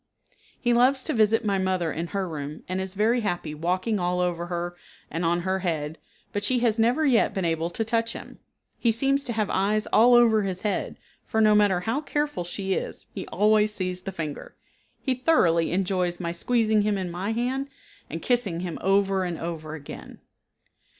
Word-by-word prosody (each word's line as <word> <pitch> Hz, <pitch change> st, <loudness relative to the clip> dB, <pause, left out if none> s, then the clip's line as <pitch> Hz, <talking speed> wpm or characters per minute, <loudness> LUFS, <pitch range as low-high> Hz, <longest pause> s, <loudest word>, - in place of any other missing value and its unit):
He 240 Hz, -1 st, +2 dB
loves 260 Hz, +2 st, +4 dB
to -, -, -1 dB
visit 225 Hz, 0 st, +3 dB
my 200 Hz, -2 st, +1 dB
mother 185 Hz, -3 st, 0 dB
in 165 Hz, +2 st, -3 dB
her 195 Hz, 0 st, -2 dB
room, 150 Hz, -2 st, -6 dB
and 185 Hz, +1 st, -2 dB
is 190 Hz, 0 st, -6 dB
very 225 Hz, +4 st, +2 dB
happy 175 Hz, -7 st, -2 dB
walking 185 Hz, +7 st, -1 dB
all 180 Hz, 0 st, 0 dB
over 175 Hz, -1 st, -1 dB
her 175 Hz, 0 st, -3 dB, 0.4 s
and 165 Hz, +3 st, -2 dB
on 170 Hz, +1 st, +1 dB
her 190 Hz, +2 st, -1 dB
head, 160 Hz, -4 st, -3 dB, 0.3 s
but 205 Hz, -, -2 dB
she 250 Hz, +5 st, +2 dB
has 235 Hz, -2 st, +2 dB
never 245 Hz, +8 st, +3 dB
yet 250 Hz, -5 st, +3 dB
been 190 Hz, -2 st, -1 dB
able 165 Hz, 0 st, 0 dB
to 200 Hz, +6 st, -2 dB
touch 230 Hz, 0 st, 0 dB
him. -, -, -10 dB, 0.4 s
He 235 Hz, -, +3 dB
seems 275 Hz, +5 st, +1 dB
to 240 Hz, -, -2 dB
have 215 Hz, -2 st, -1 dB
eyes 210 Hz, +3 st, +1 dB
all 240 Hz, +3 st, +7 dB
over 230 Hz, -3 st, +5 dB
his 190 Hz, -2 st, -4 dB
head, 210 Hz, -, -2 dB, 0.3 s
for, 220 Hz, -, 0 dB
no 215 Hz, -1 st, +5 dB
matter 205 Hz, -4 st, +3 dB
how 230 Hz, +9 st, -1 dB
careful 295 Hz, -, -2 dB
she 190 Hz, +2 st, -3 dB
is, -, -, -4 dB
he -, -, -6 dB
always 210 Hz, 0 st, +3 dB
sees 185 Hz, -1 st, -3 dB
the 195 Hz, -, -5 dB
finger. 155 Hz, -5 st, -6 dB, 0.4 s
He 265 Hz, -, 0 dB
thoroughly 185 Hz, -, +2 dB
enjoys 180 Hz, -1 st, 0 dB
my 170 Hz, -2 st, -2 dB
squeezing 220 Hz, +4 st, +2 dB
him 205 Hz, -1 st, +1 dB
in 185 Hz, -2 st, -3 dB
my 185 Hz, +5 st, -3 dB
hand, 255 Hz, +4 st, -1 dB, 0.4 s
and -, -, -6 dB
kissing 220 Hz, -9 st, 0 dB
him 175 Hz, -3 st, -4 dB
over 195 Hz, 0 st, +2 dB
and 175 Hz, -2 st, -3 dB
over 160 Hz, -2 st, -5 dB
again. 145 Hz, -2 st, -10 dB
195 Hz, 195 wpm, -26 LUFS, 175-225 Hz, 0.4 s, all